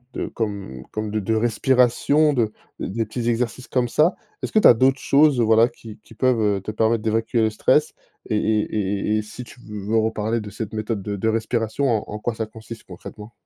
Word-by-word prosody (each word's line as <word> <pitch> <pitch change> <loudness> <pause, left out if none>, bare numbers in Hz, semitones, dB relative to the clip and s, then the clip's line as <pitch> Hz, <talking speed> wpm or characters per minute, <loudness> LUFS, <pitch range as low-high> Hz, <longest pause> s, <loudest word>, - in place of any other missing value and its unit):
de - - -2
comme 100 - -5
comme 110 -1 -4
de 110 - -1
de 110 +2 -1
respiration, 125 +6 +3
de 115 -5 +1 0.3
des 110 +4 -2
petits 115 +2 -3
exercices 120 +2 -2
comme 125 -2 0
ça. 155 +8 +2 0.3
Est-ce - - -4
que - - 0
tu - - +7
as - - +9
d'autres 130 +4 +3
choses, 145 -2 +4
heu, - - +4
voilà, 110 +1 +5
qui 115 -3 -12
qui 115 - -17
peuvent, 125 -1 +2
heu, 100 -2 +1
te 100 - -5
permettre 110 +1 +1
d'évacuer 115 +1 0
le 110 - +2
stress 105 - +2 0.3
et - - -1
et 105 0 +2
et 100 -1 -1 0.2
et - - +2
et - - 0
si 105 +4 -9
tu 120 - -15
v - - -17 0.2
veux 110 +1 +2
reparler 110 +1 -1
de 105 - -8
cette 105 +1 -6
méthode 110 -1 -3
de 100 +1 -3
de 100 +3 -2
respiration? 115 +3 -1
En 110 -4 -1
en - - -3
quoi 115 +2 -2
ça 110 0 -4
consiste 110 +1 -11
concrètement? 105 +4 -11
110 Hz, 225 wpm, -22 LUFS, 105-120 Hz, 0.3 s, as